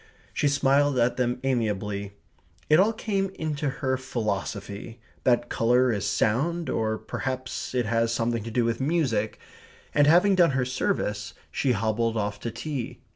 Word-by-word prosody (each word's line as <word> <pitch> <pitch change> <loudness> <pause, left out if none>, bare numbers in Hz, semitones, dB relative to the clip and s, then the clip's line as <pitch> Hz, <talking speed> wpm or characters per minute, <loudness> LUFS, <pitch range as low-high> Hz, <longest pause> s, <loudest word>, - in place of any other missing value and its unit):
She 145 - +1
smiled 140 0 +3
at 120 0 +2
them 125 0 0
amiably. 105 -5 -1 0.6
It 155 - +7
all 205 +4 +5
came 200 -3 -1
into 150 -2 -2
her 130 0 -1
philosophy 110 -2 -4 0.3
that 120 -1 +3
colour 125 +2 +3
is 100 -3 -1
sound, 160 +10 0
or 110 0 0
perhaps 130 +1 -4
it 125 -2 +1
has 115 +1 +1
something 115 0 0
to 115 - -6
do 115 +1 +1
with 115 +1 -1
music. 130 -9 0 0.6
And 145 -1 +4
having 180 +6 +6
done 175 -5 +5
her 125 - +1
service, 110 - -2 0.2
she 130 -3 +1
hobbled 115 +2 0
off 105 -1 -2
to 115 - -4
tea. 125 +2 -5
125 Hz, 155 wpm, -26 LUFS, 110-145 Hz, 0.6 s, It